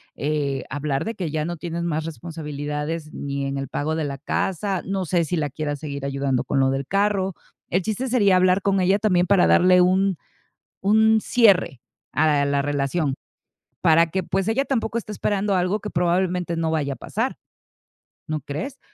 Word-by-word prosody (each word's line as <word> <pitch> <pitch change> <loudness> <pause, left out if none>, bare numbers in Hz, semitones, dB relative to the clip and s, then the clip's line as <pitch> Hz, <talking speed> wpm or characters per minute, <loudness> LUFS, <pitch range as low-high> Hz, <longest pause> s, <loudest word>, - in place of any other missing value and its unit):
eh, 145 -2 -1
hablar 145 +1 -2
de 225 - -2
que 175 -5 -3
ya 155 0 -2
no 175 0 -4
tienes 170 +1 -4
más 160 -2 -1
responsabilidades 155 -1 -5
ni 140 -1 -3
en 135 0 -3
el 135 - -4
pago 155 +2 -2
de 160 -2 -1
la 140 -1 -4
casa, 190 +6 -1
no 190 -1 -2
sé 170 +1 +1
si 170 +3 -2
la 150 -3 -1
quieras 145 0 -3
seguir 140 -2 -6
ayudando 140 -2 -1
con 140 - 0
lo 135 0 +3
del 135 0 -3
carro. 195 -2 +1 0.3
El 180 +1 +1
chiste 220 +5 -2
sería 205 -7 +4
hablar 185 +1 +3
con 195 -1 +2
ella 190 +2 +3
también 185 -4 +2
para 195 -2 +5
darle 180 0 +5
un 190 0 +2 0.7
un 220 +2 +4
cierre 195 - +3 0.3
a 145 -1 +3
la 140 0 +1
relación 145 +1 0 0.7
para 165 +1 +5
que, 185 +2 -2
pues, 190 +2 -1
ella 270 +5 +1
tampoco 235 -4 -1
esté 215 -2 -5
esperando 200 -1 0
algo 185 +4 +1
que 210 - -6
probablemente 175 -1 0
no 165 -1 0
vaya 145 -3 -1
a - - -9
pasar, - - -3 0.9
¿no 155 -2 -2
crees? 155 - -5
170 Hz, 185 wpm, -23 LUFS, 145-195 Hz, 0.9 s, para